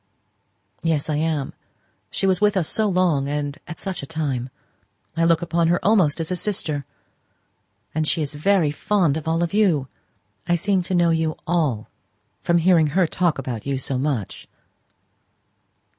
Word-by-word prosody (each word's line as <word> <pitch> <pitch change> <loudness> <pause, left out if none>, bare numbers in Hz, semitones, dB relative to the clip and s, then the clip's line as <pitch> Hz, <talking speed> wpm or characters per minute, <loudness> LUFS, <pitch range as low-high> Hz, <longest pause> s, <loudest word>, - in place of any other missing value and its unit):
"Yes, 160 -2 0
I 150 - 0
am. 155 -3 -1 0.6
She - - -2
was 190 +1 +2
with 210 -1 +3
us 170 -4 +1
so 220 -1 +1
long; 175 -7 +1
and 145 +1 -3
at 165 - -7
such 190 -2 -4
a 140 - -8
time! 140 -6 -2 0.7
I 165 0 +2
look 165 0 +3
upon 170 -1 +1
her 175 +1 +2
almost 190 -8 +3
as 165 +2 -3
a - - +1
sister." 160 -7 -2 1.1
"And 155 0 0
she 160 -1 +1
is 145 - -3
very 160 0 +2
fond 170 -1 +1
of 160 0 -5
all 165 +1 +1
of 170 - -2
you. 175 -11 +2 0.6
I 175 - +3
seem 190 +2 +1
to 185 - +1
know 170 -1 +4
you 160 -1 0
all 150 -11 0 0.5
from 170 - +2
hearing 170 -2 +4
her 180 +5 +2
talk 170 0 0
about 125 -3 -5
you 140 -1 0
so 130 0 -2
much. 135 -8 -3
160 Hz, 170 wpm, -22 LUFS, 145-180 Hz, 1.1 s, know